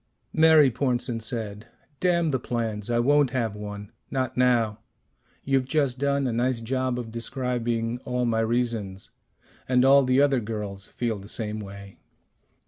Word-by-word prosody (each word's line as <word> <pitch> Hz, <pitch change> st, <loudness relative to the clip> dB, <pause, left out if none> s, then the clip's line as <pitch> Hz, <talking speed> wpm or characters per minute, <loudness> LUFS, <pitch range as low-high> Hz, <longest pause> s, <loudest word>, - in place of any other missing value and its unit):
Mary 155 Hz, -4 st, +6 dB
Pornsen 120 Hz, -2 st, 0 dB
said, 110 Hz, -2 st, -5 dB, 0.3 s
"Damn 170 Hz, -2 st, +2 dB
the 130 Hz, -3 st, 0 dB
plans. 115 Hz, -3 st, -3 dB
I 120 Hz, -, +1 dB
won't 145 Hz, +3 st, +4 dB
have 115 Hz, -5 st, -2 dB
one. 105 Hz, -1 st, -7 dB, 0.2 s
Not 130 Hz, -1 st, -2 dB
now. 120 Hz, -4 st, +2 dB, 0.6 s
You've 135 Hz, -2 st, +1 dB
just 135 Hz, -3 st, 0 dB
done 140 Hz, 0 st, +1 dB
a 125 Hz, -, -1 dB
nice 120 Hz, +1 st, 0 dB
job 130 Hz, +2 st, -1 dB
of 115 Hz, -2 st, -5 dB
describing 120 Hz, -1 st, -2 dB
all 125 Hz, 0 st, -1 dB
my 115 Hz, -1 st, +1 dB
reasons. 115 Hz, -4 st, -1 dB, 0.6 s
And 125 Hz, 0 st, +4 dB
all 140 Hz, +1 st, +7 dB
the 130 Hz, +1 st, +3 dB
other 140 Hz, -2 st, +4 dB
girls 105 Hz, -3 st, -5 dB
feel 115 Hz, -4 st, -3 dB
the 100 Hz, -, -11 dB
same 110 Hz, -1 st, -3 dB
way." 100 Hz, -1 st, -10 dB
120 Hz, 150 wpm, -26 LUFS, 110-130 Hz, 0.6 s, all